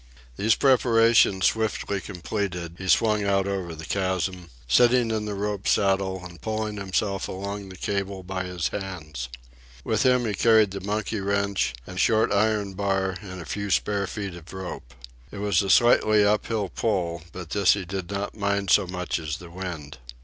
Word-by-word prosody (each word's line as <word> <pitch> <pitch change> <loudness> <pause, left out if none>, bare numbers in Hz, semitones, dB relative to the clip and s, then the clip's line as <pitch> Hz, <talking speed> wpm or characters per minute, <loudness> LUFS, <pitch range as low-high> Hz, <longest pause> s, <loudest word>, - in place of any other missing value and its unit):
These 105 - +3
preparations 115 -6 +4
swiftly 110 -3 0
completed, 90 -3 -4
he 95 - -6
swung 105 +1 +3
out 100 -1 +1
over 95 -4 -3
the 80 +1 -8
chasm, 95 -2 -2 0.2
sitting 120 - +4
in 110 -1 -1
the 105 -1 -3
rope 100 0 -3
saddle 95 -2 +1
and 85 -2 -11
pulling 110 -1 -3
himself 100 0 -1
along 100 +1 -5
the 95 - -10
cable 100 -1 -3
by 95 0 -4
his 90 -2 -2
hands. 80 -11 -6 0.5
With 110 - 0
him 125 -1 +3
he 105 - -1
carried 110 0 +4
the 100 0 -5
monkey 105 +2 -2
wrench 100 -7 0
and 90 +1 -7
short 110 +1 +3
iron 105 -1 +1
bar 95 -1 -1
and 95 -3 -8
a - - -13
few 100 0 -4
spare 100 0 +1
feet 100 -3 -5
of 85 -1 -11
rope. 90 -10 -7 0.4
It - - -8
was 100 -3 +2
a 100 - -3
slightly 110 0 +5
up 105 +1 +2
hill 105 -4 -1
pull, 85 -7 -1
but 90 -3 -8
this 100 -3 +4
he 100 -3 -4
did 95 0 -5
not 100 0 -3
mind 100 -2 0
so 100 -3 +5
much 90 -1 -3
as 75 -3 -4
the 85 -1 -12
wind. 85 -7 -7
100 Hz, 180 wpm, -25 LUFS, 90-105 Hz, 0.5 s, slightly